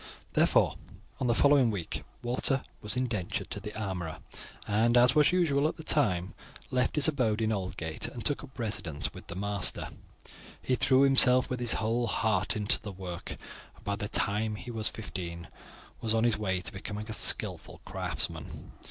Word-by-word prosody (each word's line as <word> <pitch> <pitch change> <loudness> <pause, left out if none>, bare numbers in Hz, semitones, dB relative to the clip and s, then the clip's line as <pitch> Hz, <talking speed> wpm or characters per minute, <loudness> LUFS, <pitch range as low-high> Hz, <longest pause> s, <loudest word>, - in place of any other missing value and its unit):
Therefore, - - +3 0.4
on 130 - -1
the 120 - +2
following 140 -3 +4
week 95 -7 -4 0.2
Walter 125 +2 -1 0.2
was 105 +4 -3
indentured 115 -8 -3
to - - -3
the 105 +1 -7
armourer, 90 -6 -4 0.5
and, 115 +3 +2
as 125 +1 +5
was 150 +2 +4
usual 155 -5 +2
at - - -4
the 160 - -7
time, 95 - +1 0.4
left 125 -1 0
his 150 0 +5
abode 125 -8 0
in 110 -1 0
Aldgate 90 -5 -4
and 120 - -8
took 145 - +2
up - - -10
his - - -18
residence 95 -10 -2
with - - -13
his 85 - -6
master. 100 -1 -1 0.7
He 130 - -2
threw 130 +1 +3
himself 130 -2 +6
with 125 - -2
his 120 -2 +4
whole 115 +2 0
heart 105 -3 0
into 105 +3 0
the 105 - -7
work, 90 -2 -6 0.4
and - - -20
by 100 - -2
the 105 0 -5
time 105 +1 0
he 120 +4 -8
was 110 -2 -1
fifteen 85 -6 -7 0.5
was 115 -1 0
on 110 - +2
the 115 - +1
way 95 -3 -2
to - - -7
become 100 +1 -6
a 105 +1 -6
skilful 105 - +5
craftsman. - - -4
110 Hz, 180 wpm, -29 LUFS, 100-125 Hz, 0.7 s, himself